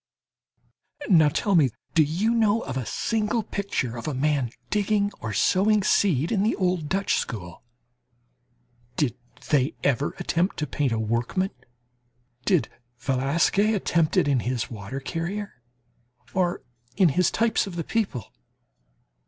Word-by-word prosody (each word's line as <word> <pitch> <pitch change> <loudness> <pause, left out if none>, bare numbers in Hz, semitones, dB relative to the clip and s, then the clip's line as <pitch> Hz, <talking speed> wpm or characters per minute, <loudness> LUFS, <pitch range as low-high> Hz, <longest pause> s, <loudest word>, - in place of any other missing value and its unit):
Now 160 -6 +6
tell 200 +7 0
me, 155 -7 +5 0.2
do 165 - +5
you 175 +10 +1
know 225 -1 +3
of 130 - -5
a 130 -4 -3
single 225 0 0
picture 195 - -3
of 115 - -6
a 150 - -2
man 140 -2 +1 0.2
digging 205 0 +1
or 110 - -4
sowing 205 - +3
seed 170 -6 +2
in 205 -4 +2
the 215 +3 +2
old 180 -5 0
Dutch 195 +1 +1
School? 90 -8 -6 1.3
Did 140 -6 0 0.4
they 140 -1 +2
ever 140 +1 +1
attempt 175 +4 0
to 150 - -1
paint 145 -3 -1
a 115 - 0
workman? 115 - -1 0.9
Did 165 - +3 0.3
Velasquez 150 - +1
attempt 170 -5 +1
it - - +4
in 140 -3 +3
his 120 -1 -2
"Water 110 +4 -6
Carrier" 170 +1 -5 0.7
or 180 -2 0 0.3
in 185 -4 +5
his 175 +4 +2
types 225 -2 +1
of 185 - -7
the 170 - -2
people? 190 - -2
165 Hz, 140 wpm, -25 LUFS, 130-200 Hz, 1.3 s, Now